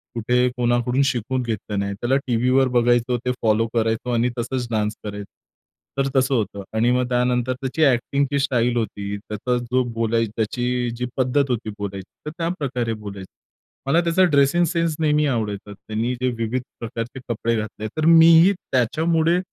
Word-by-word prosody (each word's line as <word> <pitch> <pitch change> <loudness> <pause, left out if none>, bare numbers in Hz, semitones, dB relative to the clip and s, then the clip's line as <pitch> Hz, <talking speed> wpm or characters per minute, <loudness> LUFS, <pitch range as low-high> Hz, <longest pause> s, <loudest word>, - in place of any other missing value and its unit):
कुठे 125 +2 +2
कोणाकडून 120 +2 +1
शिकून 130 0 -1
घेतलं 110 -3 -3
नाही. 100 0 -2
त्याला 120 +6 0
टीव्हीवर 125 +2 +3
बघायचो, 120 +1 +2
ते 125 - +2
फॉलो 110 0 +2
करायचो 115 +1 0
आणि 120 +1 +2
तसंच 125 +1 -2
डान्स 105 -1 0
करायचं, 100 -1 -7 0.7
तर 135 0 +1
तसं 130 +1 +3
होतं. 100 -3 -2
आणि 115 +2 +3
मग 125 0 +1
त्यानंतर 125 0 +1
त्याची 135 +4 -3
एक्टिंगची 140 +1 +2
स्टाईल 125 -3 +1
होती, 100 -2 -3
त्याचा 110 +4 -3
जो 130 0 +3
बोलाय 115 0 +1
त्याची 125 +2 -1
जी 125 - -2
पद्धत 135 +2 +1
होती 120 -3 -2
बोलायची, 100 -2 -6 0.2
तर 150 - -4
त्याप्रकारे 140 -9 -2
बोलायचं. 100 -3 -8 0.6
मला 165 +5 +4
त्याचा 170 +2 +3
ड्रेसिंग 140 +4 +4
सेन्स 165 -1 0
नेहमी 150 -1 +2
आवडायचा. 105 -5 -3
त्यांनी 110 +4 -3
जे 130 - +2
विविध 115 +2 -1 0.2
प्रकारचे 115 +2 -5
कपडे 115 0 0
घातले, 110 0 -4
तर 155 - 0
मीही 165 +3 +7 0.2
त्याच्यामुळे 160 +7 +2
125 Hz, 155 wpm, -22 LUFS, 110-135 Hz, 0.7 s, मीही